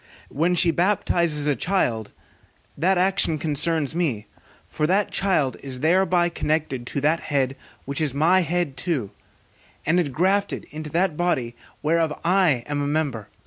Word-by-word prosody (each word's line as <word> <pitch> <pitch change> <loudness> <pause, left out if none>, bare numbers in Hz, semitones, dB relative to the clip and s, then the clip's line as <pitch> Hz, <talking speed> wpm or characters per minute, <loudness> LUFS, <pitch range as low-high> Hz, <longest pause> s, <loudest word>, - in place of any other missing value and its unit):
When 170 +5 +1
she 170 0 +4
baptizes 170 -4 +1
a 145 -1 +2
child, 120 - -1 0.6
that 185 +3 +2
action 180 -3 +3
concerns 155 -1 0
me; 145 -11 -1 0.4
for 150 - -1
that 195 +4 +1
child 165 -9 +1
is 130 -2 -5
thereby 175 +2 +3
connected 150 -7 -2
to 140 - -3
that 155 +4 +2
body 135 -2 0 0.3
which 140 +3 -3
is 150 -3 +1
my 160 +7 +3
head 175 -5 -1
too, 130 - -2 0.7
and 170 +4 +3
ingrafted 185 +7 0
into 155 0 -6
that 170 +1 0
body 130 -9 -1 0.3
whereof 160 0 +1
I 175 -9 +3
am 145 -1 -2
a 140 - -1
member. 145 -8 -2
155 Hz, 145 wpm, -23 LUFS, 140-175 Hz, 0.7 s, she